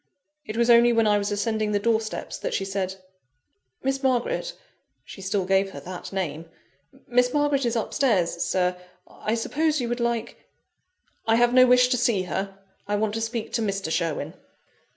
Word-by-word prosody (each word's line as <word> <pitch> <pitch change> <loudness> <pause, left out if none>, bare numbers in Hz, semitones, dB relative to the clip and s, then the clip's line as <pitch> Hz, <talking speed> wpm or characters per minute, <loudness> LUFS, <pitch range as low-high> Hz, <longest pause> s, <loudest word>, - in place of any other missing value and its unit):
It 215 - -5
was 235 0 +4
only 235 +1 +6
when 230 -1 +3
I 210 -1 +3
was 200 +1 -2
ascending 215 +1 -1
the - - +3
door 220 +2 +2
steps 215 - -6
that - - -3
she 195 - -1
said 195 -1 -3 0.9
"Miss 270 0 -1
Margaret" 265 - 0 0.5
(she 195 - -11
still 190 0 -1
gave 195 +1 +2
her - - -7
that 180 -1 -8
name!) 165 -4 -4 0.6
"Miss 250 0 +2
Margaret 290 -2 +1
is 235 - -1
upstairs, 210 -8 +1
Sir. 180 -1 0 0.3
I 215 - -3
suppose 300 +6 0
you 245 - -2
would 240 +1 -2
like 235 -1 -2 0.4
" 370 -8 -39
"I 225 - +4
have 240 +1 +3
no 255 0 +7
wish 250 0 +6
to 250 - +2
see 230 -6 +1
her: 195 +2 -4 0.3
I 205 - 0
want 210 0 0
to 225 - -2
speak 225 0 -4
to 230 - 0
Mr. 195 -6 -2
Sherwin." 165 -2 -2
225 Hz, 185 wpm, -25 LUFS, 195-245 Hz, 0.9 s, no